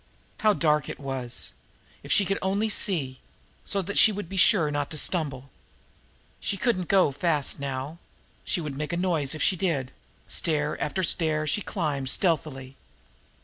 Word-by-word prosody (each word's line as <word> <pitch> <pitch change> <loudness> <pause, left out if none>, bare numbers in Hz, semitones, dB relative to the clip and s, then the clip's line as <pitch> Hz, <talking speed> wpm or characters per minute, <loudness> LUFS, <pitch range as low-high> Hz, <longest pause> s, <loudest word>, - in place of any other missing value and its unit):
How 215 -2 +4
dark 150 -6 +2
it - - -6
was! 135 - -4 0.5
If - - -8
she 200 - +5
could 195 +2 -1
only 200 +3 +1
see 140 -12 +1 0.4
so 195 -1 -1
that 200 +3 0
she 220 - +7
would 205 -3 -5
be 195 - -6
sure 185 -5 +5
not 145 -1 -1
to 155 - -6
stumble! 140 -5 -1 0.9
She 200 - -2
couldn't 185 -6 0
go 190 -7 +4
fast 150 0 0
now 140 +3 -4 0.4
she 175 - -1
would 150 -3 -5
make 150 +4 -3
a - - 0
noise 165 -6 0
if 155 - -2
she 190 - +3
did. 160 -8 -1 0.4
Stair 150 -2 0
after 185 +5 -1
stair 155 -3 +1
she 155 +8 0
climbed 150 -10 -2
stealthily. 135 -6 0
155 Hz, 165 wpm, -27 LUFS, 140-190 Hz, 0.9 s, she